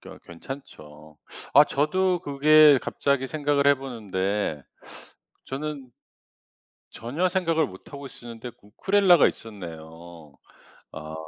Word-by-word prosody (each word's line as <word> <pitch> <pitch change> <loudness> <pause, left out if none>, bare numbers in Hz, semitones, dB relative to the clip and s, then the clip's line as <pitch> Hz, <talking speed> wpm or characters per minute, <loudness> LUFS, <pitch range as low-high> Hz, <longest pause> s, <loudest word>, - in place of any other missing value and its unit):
그 - - -14
어 - - -12
괜찮죠. 80 - -11 0.4
아 145 - +9
저도 180 +6 0
그게 150 +1 +6
갑자기 140 -2 -1
생각을 145 -2 +1
해 140 - +5
보는데 105 - -3 0.8
저는 140 -2 -6 1.0
전혀 145 +11 -2
생각을 165 -4 +1
못 95 - -14
하고 140 0 -8
있었는데 120 -2 -9
우쿨렐레가 180 - +3
있었네요. 85 -5 -9 0.6
아. 75 0 -8
135 Hz, 235 characters per minute, -25 LUFS, 95-150 Hz, 1.0 s, 아